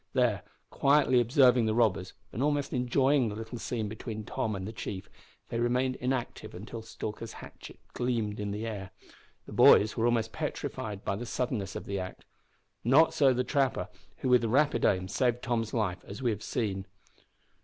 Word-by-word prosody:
There, 120 -7 +2 0.3
quietly 135 -3 +4
observing 125 -1 +4
the 110 - +1
robbers, 100 -6 +1 0.2
and 115 - -3
almost 145 0 0
enjoying 130 +1 +2
the 105 - -5
little 115 +2 -6
scene 115 -2 -2
between 110 +1 -6
Tom 110 0 -2
and 95 0 -5
the 110 - -6
chief, 95 -4 -6 0.4
they 115 - -2
remained 125 +2 +1
inactive 125 -1 -3
until 110 +5 -7
Stalker's 110 0 -6
hatchet - - -11
gleamed 115 -4 -1
in 105 -1 -2
the 105 +2 -3
air. 100 -4 -5 0.6
The - - -11
boys 105 +1 +6
were 115 +1 +2
almost 115 -2 0
petrified 105 -2 -4
by 100 - -1
the 120 +3 -6
suddenness 115 -7 -2
of - - -5
the 100 -1 -3
act. 90 0 -7 0.6
Not 140 +7 +5
so 140 -3 +4
the 125 0 +1
trapper, 130 -9 0 0.3
who 130 - 0
with 125 -2 +5
rapid 125 +2 +2
aim 95 -1 +2
saved 120 +4 0
Tom's 115 -2 -1
life, 100 -6 -1
as 100 - -7
we 125 -3 +1
have 105 -1 -4
seen. 100 -5 -2
115 Hz, 175 wpm, -30 LUFS, 105-125 Hz, 0.6 s, boys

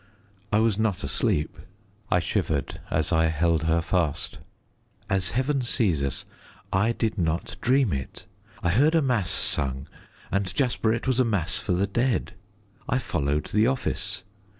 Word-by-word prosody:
I 105 - +4
was 110 -2 +2
not 105 -3 0
asleep." 70 +2 0 0.5
I 90 - +4
shivered 75 -3 -1
as 80 +2 0
I 80 -1 +4
held 80 0 +1
her 80 +1 +2
fast. 85 -4 -1 0.7
"As 95 -1 +1
Heaven 135 +1 +1
sees 105 - +1
us, 70 -2 -2 0.5
I 105 +5 +3
did 110 -2 -1
not 85 -1 -1
dream 130 - +3
it. 65 +7 -5 0.4
I 85 - +2
heard 145 - +4
a 165 - +5
mass 120 -9 +1
sung, 65 0 -1 0.4
and, 100 -1 0
Jasper, 120 -4 +1
it 115 +1 -1
was 130 -1 +2
a - - +6
mass 100 -6 0
for 105 -3 -1
the 95 +3 +2
dead. 120 +5 0 0.6
I 125 - +2
followed 75 - -1
the 105 +2 +4
office. 130 -6 -2
95 Hz, 155 wpm, -26 LUFS, 80-115 Hz, 0.7 s, a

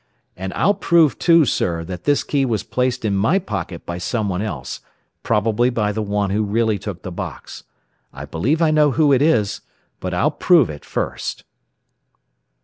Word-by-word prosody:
And 95 +1 -5
I'll 200 - +3
prove, 170 -7 +3
too, 165 -3 +5
sir, 85 -8 -1
that 90 +1 -8
this 145 - +2
key 140 -2 0
was 110 -6 -1
placed 125 +2 -1
in 100 -2 +1
my 110 - +2
pocket 95 - -5
by 85 0 -5
someone 100 -1 -2
else, 70 - -5 0.4
probably 115 +2 +1
by 105 -4 0
the 110 +1 -3
one 100 -1 -1
who 105 +2 +1
really 110 0 0
took 95 -3 -7
the 95 - -6
box. 85 - -7 0.5
I - - -8
believe 135 - 0
I 155 - +3
know 150 -2 +3
who 145 +1 +3
it 130 - +3
is, 115 -10 +2 0.4
but - - -4
I'll - - +1
prove 160 - +3
it 75 - -10
first." - - -4
110 Hz, 175 wpm, -20 LUFS, 95-140 Hz, 0.5 s, too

